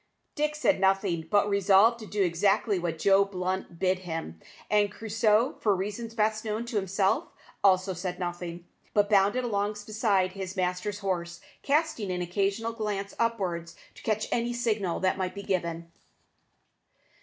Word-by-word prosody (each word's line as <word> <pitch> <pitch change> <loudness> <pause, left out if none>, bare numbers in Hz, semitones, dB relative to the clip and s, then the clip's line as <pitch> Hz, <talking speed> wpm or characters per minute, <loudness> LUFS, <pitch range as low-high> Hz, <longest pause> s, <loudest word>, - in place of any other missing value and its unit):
Dick 300 0 -1
said 295 -5 +2
nothing, 190 -4 +1
being 205 0 +4
resolved 200 +3 +4
to 215 - -9
do 205 -1 0
exactly 195 +3 +2
what 170 -2 -2
Joe 195 +3 +5
Blunt 185 -2 -4
bid 185 +1 +1
him; 165 - -6 0.3
and 205 -1 +2
Crusoe, 225 +4 +1
for 205 -3 +2
reasons 210 +4 -4
best 215 0 +1
known 220 +1 -2
to 235 - -6
himself, 195 0 +1 0.4
also 190 -1 +4
said 180 0 -4
nothing, 175 -1 -5 0.3
but 205 0 +3
bounded 205 +5 +4
along 205 -3 0
beside 205 -4 +1
his 190 0 -6
master's 180 +2 -1
horse, 175 -4 -3 0.2
casting 285 - 0
an 180 0 -2
occasional 200 +5 -1
glance 205 -3 -3
upwards 185 -8 -1 0.2
to - - -14
catch 215 -1 -1
any 240 0 0
signal 215 -7 -1
that 190 0 +1
might 185 0 -2
be 200 - -6
given. 170 -3 -2
195 Hz, 155 wpm, -28 LUFS, 180-215 Hz, 0.4 s, Joe